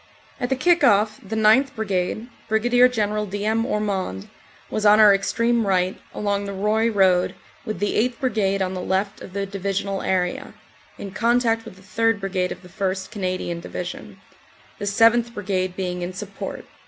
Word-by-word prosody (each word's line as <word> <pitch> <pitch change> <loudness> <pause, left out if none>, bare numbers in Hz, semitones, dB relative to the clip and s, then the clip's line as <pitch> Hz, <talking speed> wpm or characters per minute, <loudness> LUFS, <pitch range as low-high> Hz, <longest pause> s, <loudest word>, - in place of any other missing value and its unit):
At 245 -2 -2
the 265 - +2
kick 345 +5 +3
off 210 +1 +3
the 215 +2 -5
9th. 220 +5 +4
Brigade, 210 +1 -2 0.2
Brig. 245 +3 +4
General 210 -2 -1
D. 205 +1 -4
M. 225 +2 +1
Ormond, 195 - -2 0.4
was 215 - -2
on 210 0 +6
our 210 -2 +8
extreme 230 +3 +1
right, 185 -1 0
along 200 -1 -2
the 200 - -5
Roye 215 +4 +1
road, 190 -4 +3 0.3
with 215 -4 -4
the 205 +3 -1 0.2
8th. 250 - -19
Brigade 205 -7 0
on 185 0 -3
the 185 - -4
left 190 +2 -1
of 185 - -10
the 200 0 -2
Divisional 195 0 -3
area 180 -1 -1 0.4
(in 200 - -7
contact 230 +1 +1
with 220 - -10
the 190 - -18
3rd. 225 +3 +1
Brigade 190 -2 -1
of - - -7
the - - -12
1st. 190 +1 -3
Canadian 185 -4 -3
Division), 175 +1 -7 0.6
the 205 - -3
7th. 230 +3 +3
Brigade 185 -2 -2
being 180 -1 -3
in 175 +1 -4
support. 200 +1 -7
200 Hz, 175 wpm, -23 LUFS, 190-225 Hz, 0.6 s, our